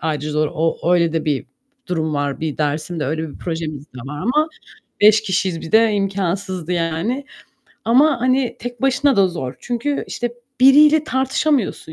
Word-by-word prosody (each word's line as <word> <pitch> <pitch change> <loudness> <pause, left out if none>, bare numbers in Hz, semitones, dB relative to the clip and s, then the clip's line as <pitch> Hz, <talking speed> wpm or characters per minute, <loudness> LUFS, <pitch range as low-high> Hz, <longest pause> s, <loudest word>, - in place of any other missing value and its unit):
ayrıca 150 -1 -2
zor. 150 0 +1
O 165 +2 0
öyle 170 -2 +2
de 160 - -1
bir 145 -4 -1 0.4
durum 160 -3 -1
var, 145 -1 -2
bir 155 -2 -3
dersimde, 155 +2 -2
öyle 160 +2 -2
bir - - -13
projemiz 155 -4 -5
de 125 - -14
var 145 +2 -6
ama, 300 +8 +2 0.5
5 210 +1 +6
kişiyiz 185 -4 -1
bir 160 - -9
de 220 -1 +5
imkânsızdı 190 -3 -2
yani; 175 - -1 0.6
ama, 265 +3 +4
hani, 255 0 +1
tek 245 +1 -7
başına 270 0 +2
da 195 -2 +4
zor. 135 -7 -5
Çünkü, 245 +4 -2
işte, 240 -1 -4 0.3
biriyle 295 +3 +6
tartışamıyorsun, 265 - 0
185 Hz, 160 wpm, -19 LUFS, 160-245 Hz, 0.6 s, 5